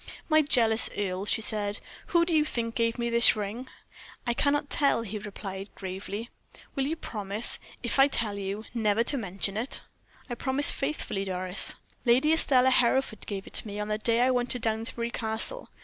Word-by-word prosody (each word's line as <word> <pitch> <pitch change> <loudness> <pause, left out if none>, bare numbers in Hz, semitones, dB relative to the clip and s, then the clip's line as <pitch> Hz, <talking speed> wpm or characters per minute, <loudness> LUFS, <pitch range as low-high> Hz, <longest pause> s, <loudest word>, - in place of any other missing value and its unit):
"My 310 -1 +5
jealous 230 -6 +4
Earle," 190 -1 -3
she 225 - +1
said; 205 -1 -2 0.3
"who 340 -1 +2
do 340 - -2
you 305 - +4
think 230 -6 -3
gave 230 0 -1
me 235 -1 -2
this 235 0 +9
ring?" 215 +5 -5 0.6
"I 240 - 0
cannot 285 +3 +1
tell," 280 -5 +2
he 215 -1 -5
replied, 200 -1 -8
gravely. 200 +4 -7 0.4
"Will 270 0 -2
you 320 - -2
promise, 210 -6 -1 0.2
if 240 +3 -1
I 270 - +7
tell 225 -7 -1
you, 200 +2 -5
never 220 -1 +1
to 280 - +3
mention 200 -3 -4
it?" 240 +5 -3 0.5
"I 245 - -5
promise 265 +4 +3
faithfully, 275 -8 -3
Doris." 185 0 0 0.3
"Lady 260 +6 +3
Estelle 260 -5 +3
Hereford 255 -2 +1
gave 195 -2 -5
it - - -14
to - - +3
me 205 0 -6
on 210 0 -4
the 215 0 -2
day 230 +1 +3
I 255 +1 +3
went 245 -1 -1
to 250 - -2
Downsbury 230 +1 -2
Castle. 225 - -2
230 Hz, 185 wpm, -27 LUFS, 205-255 Hz, 0.6 s, this